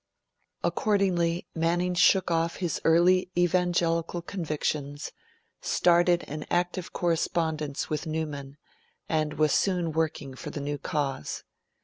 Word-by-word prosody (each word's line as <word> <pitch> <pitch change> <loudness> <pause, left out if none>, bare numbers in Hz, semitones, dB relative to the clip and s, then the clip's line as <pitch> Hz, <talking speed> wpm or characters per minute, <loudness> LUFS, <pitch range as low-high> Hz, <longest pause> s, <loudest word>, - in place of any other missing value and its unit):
Accordingly, 180 -5 +1
Manning 175 +2 +1
shook 180 +1 +4
off 165 0 +1
his 175 -3 -2
early 180 +3 +4
Evangelical 175 -1 +1
convictions, 150 -5 -3 0.5
started 175 0 +3
an 150 +1 -5
active 175 +1 -1
correspondence 160 -3 -1
with 155 +2 -3
Newman, 150 -3 -4 0.5
and 155 -1 0
was 155 -1 +2
soon 180 -4 +1
working 155 -3 -2
for 130 - -7
the - - -5
new 145 0 -3
cause. 135 - -3
165 Hz, 110 wpm, -27 LUFS, 150-175 Hz, 0.5 s, shook